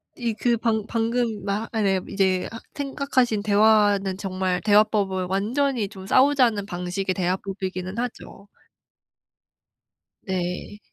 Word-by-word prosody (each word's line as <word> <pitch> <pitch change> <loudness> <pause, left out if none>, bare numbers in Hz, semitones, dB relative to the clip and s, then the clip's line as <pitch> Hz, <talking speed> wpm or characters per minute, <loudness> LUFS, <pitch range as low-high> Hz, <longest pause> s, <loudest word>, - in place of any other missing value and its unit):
이 235 -2 -2
그 240 -1 +2
방 220 -2 0
방금 230 -2 -1
말 205 +3 -2
아 220 - 0
네. 195 -2 +2
이제 190 -2 +1
아 225 - -7 0.2
생각하신 270 -6 0
대화는 205 -2 +3
정말 185 -2 -2
대화법은 205 -2 +2
완전히 225 +4 0
좀 190 -2 -11
싸우자는 255 -5 +3
방식의 180 +1 -3
대화법이기는 185 +1 -3
하죠. 235 -4 -6 1.8
네. 185 +2 -4
205 Hz, 240 characters per minute, -24 LUFS, 190-230 Hz, 1.8 s, 대화는